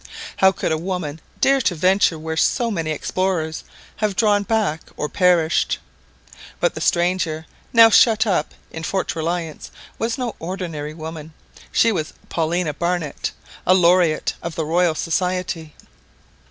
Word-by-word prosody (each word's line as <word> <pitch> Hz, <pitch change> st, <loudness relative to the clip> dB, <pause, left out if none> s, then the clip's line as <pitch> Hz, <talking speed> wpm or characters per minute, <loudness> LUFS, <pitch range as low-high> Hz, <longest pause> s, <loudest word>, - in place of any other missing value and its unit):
How 190 Hz, 0 st, +6 dB
could 190 Hz, -, -2 dB
a 160 Hz, -, 0 dB
woman 165 Hz, -4 st, -4 dB, 0.2 s
dare 275 Hz, 0 st, +4 dB
to 180 Hz, -, +1 dB
venture 185 Hz, 0 st, +3 dB
where 160 Hz, +1 st, -4 dB
so 235 Hz, +8 st, +1 dB
many 165 Hz, -6 st, -2 dB
explorers 160 Hz, 0 st, -1 dB, 0.3 s
have 210 Hz, -2 st, -1 dB
drawn 205 Hz, 0 st, +3 dB
back 200 Hz, -6 st, 0 dB, 0.2 s
or 150 Hz, -, -1 dB
perished? 175 Hz, -2 st, +2 dB, 0.8 s
But -, -, +1 dB
the -, -, -6 dB
stranger 170 Hz, -2 st, +1 dB, 0.3 s
now 225 Hz, -1 st, +8 dB
shut 225 Hz, 0 st, +5 dB
up 180 Hz, -7 st, 0 dB, 0.2 s
in 160 Hz, -, -6 dB
Fort 190 Hz, +2 st, -2 dB
Reliance 165 Hz, -1 st, -3 dB, 0.3 s
was 225 Hz, +1 st, -1 dB
no 250 Hz, -3 st, -3 dB
ordinary 165 Hz, -4 st, -5 dB
woman; 160 Hz, -1 st, -8 dB, 0.4 s
she 230 Hz, -, +4 dB
was 155 Hz, -7 st, -3 dB, 0.2 s
Paulina 165 Hz, -1 st, 0 dB
Barnett, 170 Hz, -1 st, -2 dB, 0.3 s
a 185 Hz, -, +4 dB
laureate 175 Hz, -2 st, +3 dB
of 170 Hz, -1 st, -5 dB
the 160 Hz, -, -2 dB
Royal 170 Hz, +1 st, +2 dB
Society. 180 Hz, -1 st, -2 dB
175 Hz, 140 wpm, -21 LUFS, 160-190 Hz, 0.8 s, now